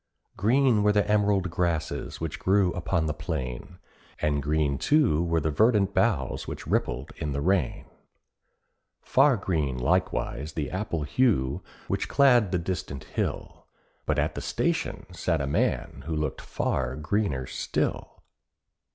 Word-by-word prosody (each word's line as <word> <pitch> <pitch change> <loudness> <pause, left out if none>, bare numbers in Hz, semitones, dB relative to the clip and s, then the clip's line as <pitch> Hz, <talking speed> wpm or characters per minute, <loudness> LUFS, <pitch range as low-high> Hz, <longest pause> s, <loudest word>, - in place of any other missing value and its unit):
Green 120 +2 +3
were 105 0 +4
the 105 -1 +2
emerald 100 -4 +2
grasses 85 -3 -2
which 80 -2 -4
grew 95 -2 +2
upon 90 -1 -1
the 75 - -1
plain, 75 -1 -5 0.4
And 75 -1 +1
green 75 -1 0
too 135 - +3
were 85 -1 +1
the 80 0 -1
verdant 105 +2 +3
boughs 85 - 0
which - - -6
rippled 65 +3 -1
in 75 -2 -3
the 70 - -2
rain, 90 -2 0 1.2
Far 140 -5 +4
green 80 -9 -1
likewise 80 -1 -1
the 75 -4 -3
apple 95 -5 -2
hue 75 - +1 0.3
which - - -1
clad 125 -8 +4
the 90 - +2
distant 85 -5 -4
hill, - - -4 0.4
But - - +1
at - - +1
the - - -5
station - - -1
sat - - 0
a 70 - -1
man 70 -1 -1
who 80 - -2
looked 75 -3 -2
far 65 -1 -2
greener 75 -4 -1
still. - - -3
85 Hz, 145 wpm, -27 LUFS, 75-100 Hz, 1.2 s, were